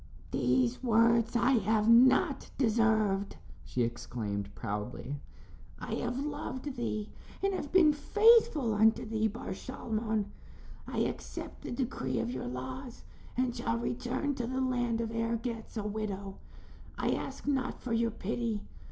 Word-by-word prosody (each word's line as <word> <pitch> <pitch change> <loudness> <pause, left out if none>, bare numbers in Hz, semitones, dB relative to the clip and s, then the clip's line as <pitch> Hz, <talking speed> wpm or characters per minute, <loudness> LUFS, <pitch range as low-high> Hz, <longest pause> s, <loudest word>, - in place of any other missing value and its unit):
"These 125 -2 +2
words 230 0 +3
I 240 +2 +4
have 215 +1 +2
not 260 +5 +5
deserved," 215 -5 +2 0.3
she 125 - -1
exclaimed, 110 -4 -3
proudly. 120 +8 -4 0.6
"I - - -5
have 245 - -2
loved 275 -1 -4
thee, 215 -3 -3 0.3
and 390 0 +2
have 290 -6 -4
been 330 -5 +6
faithful 420 - +4
unto 220 +3 +4
thee, 220 0 +1
Bar 220 +3 -6
Shalmon. 220 -1 -2 0.6
I - - -1
accept - - -4
the - - -6
decree 240 - -2
of 115 +2 -1
your 125 -1 -4
laws 180 - -6 0.3
and 250 -1 +1
shall 230 - -1
return 250 +4 -1
to 245 -3 -3
the 260 +1 -2
land 245 -3 0
of 225 -1 -3
Ergetz 230 0 -3
a 215 - -1
widow. 200 -2 -4 0.6
I - - +1
ask - - -4
not 265 -3 0
for 240 - -3
your 230 0 +2
pity. 225 0 -2
230 Hz, 140 wpm, -31 LUFS, 205-255 Hz, 0.6 s, been